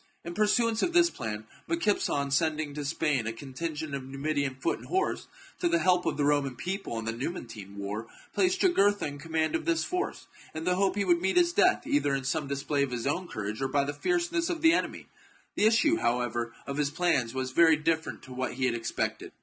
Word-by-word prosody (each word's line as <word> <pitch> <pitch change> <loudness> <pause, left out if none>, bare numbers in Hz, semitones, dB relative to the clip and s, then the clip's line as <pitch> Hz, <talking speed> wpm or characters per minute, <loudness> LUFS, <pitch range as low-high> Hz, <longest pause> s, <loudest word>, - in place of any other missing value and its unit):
In 170 - -5
pursuance 220 +3 +2
of 350 - 0
this 345 -1 +5
plan, 110 -3 -5 0.2
Micipsa, 275 -12 +1
on 140 -1 -1
sending 155 0 +1
to 150 0 -4
Spain 140 -5 0
a - - 0
contingent 145 +5 -5
of 135 -1 -3
Numidian 140 0 -2
foot 130 - -1
and - - -12
horse 380 +1 -1 0.3
to 355 -3 +2
the 340 - +3
help 180 - +2
of - - 0
the 145 - +1
Roman 145 -3 +1
people 180 - -4
in 110 - -4
the 115 - -1
Numantine 115 - -6
war, 100 +3 -4 0.3
placed 370 0 +2
Jugurtha 205 - +3
in 145 -1 -5
command 160 +1 -1
of 325 - -1
this 335 -1 +1
force, 365 0 -3 0.3
in 160 - -4
the 180 +1 +2
hope 190 0 +1
he 200 -1 0
would 175 -2 +3
meet 190 - +1
his 345 -1 +4
death, 365 -3 +3
either 285 - +2
in 135 - -3
some 145 +3 -1
display 140 +1 -1
of 140 - +1
his 125 -1 -4
own 175 +6 -1
courage 110 -3 -4
or 135 - +1
by 140 +1 +1
the 145 +1 -3
fierceness 345 - 0
of 330 -2 -3
the 325 0 +7
enemy. - - -1 0.5
The 210 - +3
issue, 295 +9 +4
however, 120 -1 0
of 140 0 -4
his 150 -1 +1
plans 145 -7 +1
was 130 0 -2
very 160 +3 +6
different 160 +1 -1
to 130 - -10
what 130 +1 -2
he 130 0 0
had 125 - +2
expected. 115 -1 -3
150 Hz, 220 wpm, -29 LUFS, 130-205 Hz, 0.5 s, the